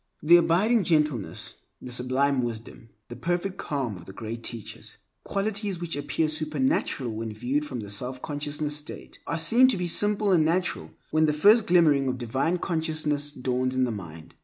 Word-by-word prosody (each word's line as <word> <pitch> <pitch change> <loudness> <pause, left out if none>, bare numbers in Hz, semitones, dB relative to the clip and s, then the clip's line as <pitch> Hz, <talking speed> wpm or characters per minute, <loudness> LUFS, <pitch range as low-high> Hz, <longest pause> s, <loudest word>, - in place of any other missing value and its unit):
The 170 +3 +8
abiding 190 +7 +3
gentleness, 150 - 0 0.2
the 125 - -9
sublime 130 +2 +1
wisdom, 115 -1 -6 0.2
the 120 - -8
perfect 175 +5 -2
calm 135 - -3
of 85 - -13
the 95 - -9
Great 115 +2 -6
Teachers—qualities 195 - -5
which 170 -1 -4
appear 145 +2 -1
supernatural 150 -5 0
when 110 0 -4
viewed 125 +7 -2
from 125 -5 -5
the 105 - -8
selfconsciousness 145 +7 -4
state—are 150 +2 -5
seen 230 +11 +6
to 250 -6 +1
be 180 - -2
simple 205 +3 +2
and 170 -4 +4
natural 175 +4 -1 0.2
when 155 0 +3
the 150 - +2
first 205 +8 +5
glimmering 155 -6 +4
of 130 0 -1
divine 130 +8 -1
consciousness 155 -4 -1
dawns 130 -2 -2
in 130 - +2
the 125 - 0
mind. 85 -7 -9
150 Hz, 160 wpm, -26 LUFS, 125-170 Hz, 0.2 s, The